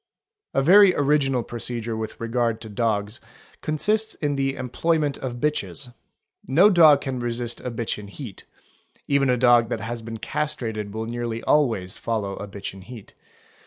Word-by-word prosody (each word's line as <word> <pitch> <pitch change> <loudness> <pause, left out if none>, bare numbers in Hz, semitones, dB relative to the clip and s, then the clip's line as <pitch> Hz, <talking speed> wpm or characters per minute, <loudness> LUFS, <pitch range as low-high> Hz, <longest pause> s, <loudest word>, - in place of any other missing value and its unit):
) 425 -1 -65
i - - +4
A - - -1
very 190 +4 +7
original 140 -3 +2
procedure 120 -1 -4
with 110 0 -5
regard 115 -1 -1
to 110 - -8
dogs 105 0 -1 0.4
consists 210 +8 +1
in 145 -2 -1
the 135 0 0
employ 135 +6 0
ment 145 -2 -1
of 125 -2 -4
bitches; 140 -1 -3 0.5
no 180 +10 +5
dog 155 -6 +7
can 130 -2 -3
resist 120 0 -3
a - - -4
bitch 115 -2 -3
in 105 - -9
heat; 105 -1 -9 0.6
even 140 -1 +2
a 125 - +3
dog 120 -2 +5
that 115 - -3
has 115 +1 -4
been 115 0 -7
castrated 110 -7 -3
will 110 +2 -4
nearly 115 0 -4
always 115 -11 +1
follow 105 -4 -2
a 105 - -6
bitch 100 -1 -7
in 95 - -12
heat. 115 +1 -12
120 Hz, 175 wpm, -24 LUFS, 115-140 Hz, 0.6 s, very